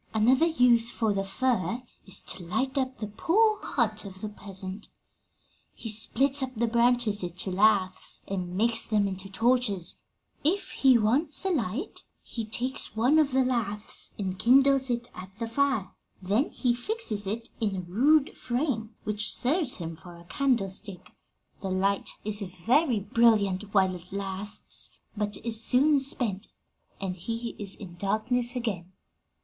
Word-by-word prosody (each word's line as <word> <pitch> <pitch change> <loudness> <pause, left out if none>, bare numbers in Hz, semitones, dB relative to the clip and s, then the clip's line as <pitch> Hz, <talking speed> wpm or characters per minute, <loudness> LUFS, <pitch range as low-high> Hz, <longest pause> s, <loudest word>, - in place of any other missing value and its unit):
"Another 255 +9 +4
use 245 -7 +3
for 225 -3 0
the 195 0 -1
fir 235 +1 -1 0.2
is 195 - -4
to 185 - -5
light 260 - -2
up 260 -1 -1
the 215 - -4
poor 410 - +2
hut 220 -4 -1
of 190 -2 -10
the 215 - -4
peasant. 195 -1 -5 0.9
'He 225 - -5
splits 270 +6 +3
up 260 -1 -4
the 235 +2 +1
branches 235 -2 +2
into 180 +2 -4
laths 190 -1 +1
and 180 -2 -4
makes 230 +2 +3
them 210 -2 +1
into 190 0 -6
torches. 220 -4 +1 0.5
If 375 +7 0
he 265 -3 +4
wants 275 - +2
a - - +2
light, 260 - -3 0.2
he 230 -2 -5
takes 240 +1 -2
one 250 +8 +4
of 295 -3 +2
the 260 0 +3
laths 215 -4 -3
and 190 -2 -4
kindles 270 +2 +5
it 240 0 -2
at 185 0 -9
the 230 - -3
fire; 230 -5 0 0.3
then 205 +9 0
he 245 -2 0
fixes 240 - -1
it 225 +3 -4
in 210 -4 -1
a 185 - -3
rude 270 - +2
frame, 240 -4 -2
which 210 0 -1
serves 285 +1 +2
him 165 -2 -6
for 175 +1 -13
a 170 - -14
candlestick. 195 -6 -1 0.5
The 195 - -3
light 195 +1 0 0.2
is 210 0 -2
very 225 - +1
brilliant 205 -2 +2
while 190 -2 +3
it 180 +1 -11
lasts, 200 +1 -2 0.2
but 210 -1 -2
is 225 -1 +4
soon 285 +5 +5
spent, 230 -7 0 0.5
and 190 -2 -3
he 230 +6 -5
is 200 -2 -5
in 180 -5 -11
darkness 235 +6 -1
again. 195 -7 -4
220 Hz, 155 wpm, -27 LUFS, 195-255 Hz, 0.9 s, kindles